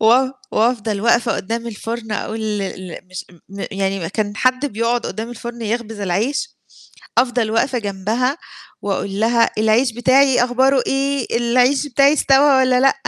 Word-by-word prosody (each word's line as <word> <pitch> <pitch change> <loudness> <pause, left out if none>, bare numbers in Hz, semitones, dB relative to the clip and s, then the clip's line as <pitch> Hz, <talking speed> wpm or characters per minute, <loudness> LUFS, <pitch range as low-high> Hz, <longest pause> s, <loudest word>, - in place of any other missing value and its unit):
و 245 +4 +4 0.2
وأفضل 220 -3 0
وقفة 235 +1 +2
قدّام 230 +4 -4
الفرن 225 0 -5
أقول 220 +2 -4
ال 210 -2 -2 0.3
ال 185 - -11
مش 185 - -7 0.2
م 200 0 -6
يعني 195 -1 -2
ما 165 - -3
كان 205 0 -3
حد 255 +4 +1
بيقعد 235 0 -1
قدّام 225 +2 -5
الفرن 235 0 -8
يخبز 225 -1 -3
العيش، 220 - -2 0.6
أفضل 240 -2 +1
واقفة 245 +3 +1
جنبها 220 - -2 0.4
وأقول 200 0 -3
لها: 230 +1 +3
"العيش 220 +3 +2
بتاعي 255 +1 +3
أخباره 260 +1 +2
إيه؟ 275 -3 -1
العيش 250 +4 +2
بتاعي 275 +2 +4
استوى 280 -2 +4
والّا 255 -1 +3
لأ؟" 270 +1 +4
235 Hz, 150 wpm, -19 LUFS, 215-255 Hz, 0.6 s, و